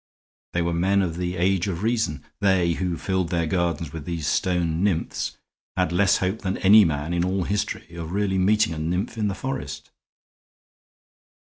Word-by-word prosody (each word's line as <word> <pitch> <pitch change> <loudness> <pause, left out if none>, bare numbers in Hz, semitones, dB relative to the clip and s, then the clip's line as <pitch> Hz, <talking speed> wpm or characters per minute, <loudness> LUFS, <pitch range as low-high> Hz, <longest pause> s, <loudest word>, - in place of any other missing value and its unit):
They 85 - +1
were 85 0 -1
men 95 +4 +2
of 85 -2 -3
the 90 0 -2
age 90 +1 +1
of 90 0 -3
Reason; 110 - 0
they, 95 -4 +3
who 90 0 -2
filled 95 -3 -1
their 85 -1 0
gardens 85 -3 -1
with 80 -3 -6
these 85 -3 -3
stone 85 0 0
nymphs, 90 -5 -1 0.4
had 90 -2 +1
less 95 +2 +3
hope 95 +4 -1
than 95 -2 -2
any 105 +3 +7
men 80 -1 -1
in 85 0 +1
all 95 +1 0
history 100 -3 -3
of 85 -1 -6
really 95 -1 0
meeting 105 0 +3
a 80 - -5
nymph 90 +8 -2
in 110 -2 0
the 100 - -2
forest." 135 +3 -5
90 Hz, 175 wpm, -24 LUFS, 85-100 Hz, 0.4 s, any